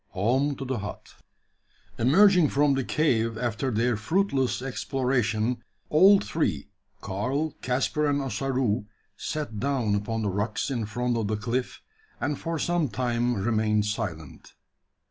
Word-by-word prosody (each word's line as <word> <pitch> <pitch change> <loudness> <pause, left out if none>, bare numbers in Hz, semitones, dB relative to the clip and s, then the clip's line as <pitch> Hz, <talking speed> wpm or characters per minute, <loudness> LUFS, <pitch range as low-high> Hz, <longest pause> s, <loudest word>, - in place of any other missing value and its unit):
HOME 130 +9 +1
TO 135 - -6
THE 130 -2 -2
HUT. 105 +1 -8 0.9
Emerging 175 - +5
from 145 0 +3
the 135 0 0
cave 115 -7 +1
after 120 +2 -1
their 120 +1 +1
fruitless 140 - 0
exploration, 125 -3 -1 0.3
all 195 +6 +7
three - - -2 0.3
Karl, 130 +11 -2
Caspar, 135 +4 0
and 145 0 +1
Ossaroo 130 -5 -1 0.3
sat 145 -9 -4
down 125 -4 0
upon 110 +2 -1
the 105 - 0
rocks 105 +7 -2
in 115 -5 -2
front 120 +2 -1
of 110 -3 -1
the 110 0 -1
cliff, 120 +4 -3 0.4
and 145 -1 -2
for 165 0 -3
some 175 -1 +1
time 120 0 0
remained 105 0 +1
silent. 100 - -5
125 Hz, 135 wpm, -26 LUFS, 110-140 Hz, 0.9 s, all